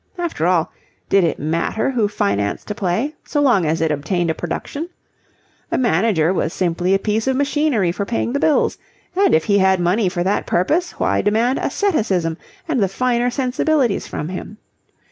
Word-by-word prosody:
After 340 Hz, -, -1 dB
all, 175 Hz, -3 st, +1 dB, 0.4 s
did 195 Hz, -1 st, +4 dB
it 165 Hz, -, 0 dB
matter 165 Hz, -, -1 dB
who 230 Hz, -5 st, +1 dB
financed 100 Hz, -, -1 dB
a -, -, 0 dB
play 205 Hz, +10 st, -1 dB
so 295 Hz, -, -2 dB
long 240 Hz, -, +3 dB
as 160 Hz, +1 st, 0 dB
it 160 Hz, -1 st, +1 dB
obtained 160 Hz, +4 st, -1 dB
a -, -, -1 dB
production? 285 Hz, -, -5 dB, 0.8 s
A -, -, +1 dB
manager 185 Hz, -7 st, +2 dB
was 165 Hz, -3 st, -1 dB
simply 180 Hz, +1 st, +1 dB
a -, -, +4 dB
piece 215 Hz, +4 st, -1 dB
of 265 Hz, -, +2 dB
machinery 280 Hz, -, +1 dB
for 200 Hz, +3 st, -3 dB
paying 235 Hz, +3 st, -2 dB
the 280 Hz, -, 0 dB
bills; 305 Hz, 0 st, +2 dB, 0.4 s
and 395 Hz, -, +4 dB
if 160 Hz, -, +2 dB
he 200 Hz, -1 st, +3 dB
had 190 Hz, -1 st, +3 dB
money 180 Hz, +3 st, +2 dB
for 175 Hz, -1 st, -2 dB
that 195 Hz, +3 st, 0 dB
purpose, 310 Hz, -, +1 dB
why -, -, 0 dB
demand 230 Hz, +5 st, +1 dB
asceticism 195 Hz, -, 0 dB, 0.3 s
and 280 Hz, -8 st, 0 dB
the 195 Hz, -, +3 dB
finer 245 Hz, +4 st, 0 dB
sensibilities 255 Hz, -2 st, 0 dB
from 150 Hz, -, -5 dB
him? 190 Hz, +3 st, -7 dB
200 Hz, 180 wpm, -19 LUFS, 175-255 Hz, 0.8 s, did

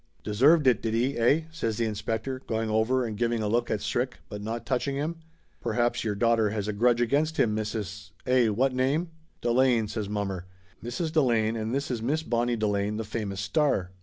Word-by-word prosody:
"Deserved 140 Hz, +9 st, +4 dB
it, 125 Hz, -4 st, +4 dB
did 115 Hz, -1 st, -1 dB
he, 125 Hz, +4 st, +1 dB
eh?" 140 Hz, +7 st, +4 dB
says 115 Hz, -9 st, -2 dB
the 115 Hz, -, +1 dB
inspector, 110 Hz, +4 st, -3 dB
going 110 Hz, -1 st, -1 dB
over 120 Hz, +4 st, +2 dB
and 110 Hz, -2 st, -4 dB
giving 120 Hz, -2 st, +1 dB
a -, -, 0 dB
look 120 Hz, +2 st, +1 dB
at 105 Hz, -, -1 dB
Strick, 125 Hz, +2 st, -1 dB
but 105 Hz, -1 st, -6 dB
not 115 Hz, +3 st, -4 dB
touching 135 Hz, +1 st, -1 dB
him. 155 Hz, +4 st, -2 dB, 0.4 s
"Perhaps 120 Hz, 0 st, 0 dB
your 105 Hz, -2 st, -1 dB
daughter 115 Hz, 0 st, +3 dB
has 105 Hz, -1 st, -3 dB
a 105 Hz, -, -1 dB
grudge 120 Hz, +3 st, +3 dB
against 145 Hz, +6 st, +1 dB
him, 105 Hz, -2 st, +2 dB
Mrs. 105 Hz, -3 st, -4 dB, 0.2 s
eh, 125 Hz, -2 st, +4 dB
what 125 Hz, +5 st, +1 dB
name?" 140 Hz, +7 st, 0 dB, 0.3 s
"Delane!" 120 Hz, -2 st, +3 dB
says 105 Hz, -1 st, -4 dB
mommer. 95 Hz, -3 st, -3 dB, 0.4 s
"Mrs. 140 Hz, +8 st, -3 dB
Delane 115 Hz, -8 st, +2 dB
and 110 Hz, 0 st, -3 dB
this 140 Hz, +1 st, -1 dB
is 120 Hz, -3 st, -2 dB
Miss 150 Hz, +7 st, 0 dB
Bonnie 120 Hz, -2 st, 0 dB
Delane, 105 Hz, -1 st, 0 dB
the 110 Hz, -, -2 dB
famous 105 Hz, -3 st, -4 dB
star." 95 Hz, -3 st, +1 dB
115 Hz, 195 wpm, -27 LUFS, 105-130 Hz, 0.4 s, Deserved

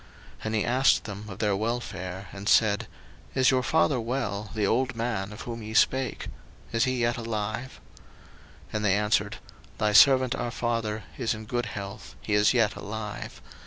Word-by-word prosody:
01:043:027 -, -, -12 dB
And 110 Hz, 0 st, -1 dB
he 105 Hz, -, +1 dB
asked 130 Hz, +3 st, +3 dB
them 105 Hz, 0 st, -7 dB
of 95 Hz, -, -8 dB
their 105 Hz, -2 st, +1 dB
welfare, 100 Hz, -4 st, -3 dB
and 100 Hz, +1 st, -4 dB
said, 105 Hz, -2 st, +4 dB, 0.5 s
Is 130 Hz, -1 st, +5 dB
your 130 Hz, -1 st, +2 dB
father 145 Hz, 0 st, +2 dB
well, 110 Hz, -4 st, -3 dB
the 105 Hz, -2 st, +1 dB
old 125 Hz, +4 st, +1 dB
man 115 Hz, -4 st, -2 dB
of 105 Hz, -, -9 dB
whom 115 Hz, -1 st, -6 dB
ye 110 Hz, 0 st, -7 dB
spake? 130 Hz, 0 st, +2 dB, 0.4 s
Is 115 Hz, -1 st, +2 dB
he 130 Hz, 0 st, 0 dB
yet 120 Hz, +1 st, +1 dB
alive? 115 Hz, +2 st, -4 dB, 0.9 s
01:043:028 -, -, -20 dB
And 105 Hz, -1 st, -1 dB
they 100 Hz, -1 st, +4 dB
answered, 105 Hz, +1 st, +1 dB, 0.4 s
Thy 105 Hz, -1 st, +1 dB
servant 130 Hz, +2 st, +7 dB
our 120 Hz, -3 st, -2 dB
father 115 Hz, -2 st, -2 dB, 0.2 s
is 115 Hz, -3 st, 0 dB
in 110 Hz, 0 st, -9 dB
good 120 Hz, +1 st, -2 dB
health, 100 Hz, 0 st, -7 dB
he 105 Hz, -, -2 dB
is 105 Hz, 0 st, +5 dB
yet 115 Hz, -4 st, +3 dB
alive. 105 Hz, 0 st, -6 dB
110 Hz, 180 wpm, -27 LUFS, 105-120 Hz, 0.9 s, servant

